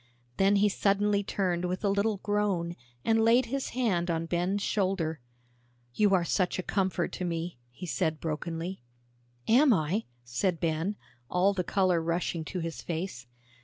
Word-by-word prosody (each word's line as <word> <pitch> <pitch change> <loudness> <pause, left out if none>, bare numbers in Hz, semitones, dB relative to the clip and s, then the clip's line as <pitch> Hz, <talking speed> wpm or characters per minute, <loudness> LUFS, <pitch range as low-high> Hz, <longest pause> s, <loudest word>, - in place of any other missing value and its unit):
Then 195 +1 +4
he 205 +1 +4
suddenly 200 0 +2
turned 180 -3 -1
with 185 +3 -2
a - - +4
little 200 +2 +1
groan, 200 -5 0 0.3
and 225 0 +3
laid 235 +3 +5
his 270 +3 -3
hand 185 -9 +1
on 165 0 0
Ben's 180 +4 0
shoulder. 185 -6 0 0.7
"You 205 - +4
are 175 -2 +2
such 180 +1 +1
a 185 - -2
comfort 190 -3 0
to - - -5
me," 170 -4 -3
he 125 +9 -9
said 160 -2 -1
brokenly. 165 +3 -4 0.7
"Am 260 +5 +6
I?" 185 +3 +1 0.2
said 145 +9 -1
Ben, 165 +4 0 0.3
all 185 +3 +3
the 185 -2 -1
color 185 -2 +2
rushing 165 0 -1
to 180 +1 -4
his 165 0 -4
face. 165 -7 -4
185 Hz, 160 wpm, -29 LUFS, 170-200 Hz, 0.7 s, Am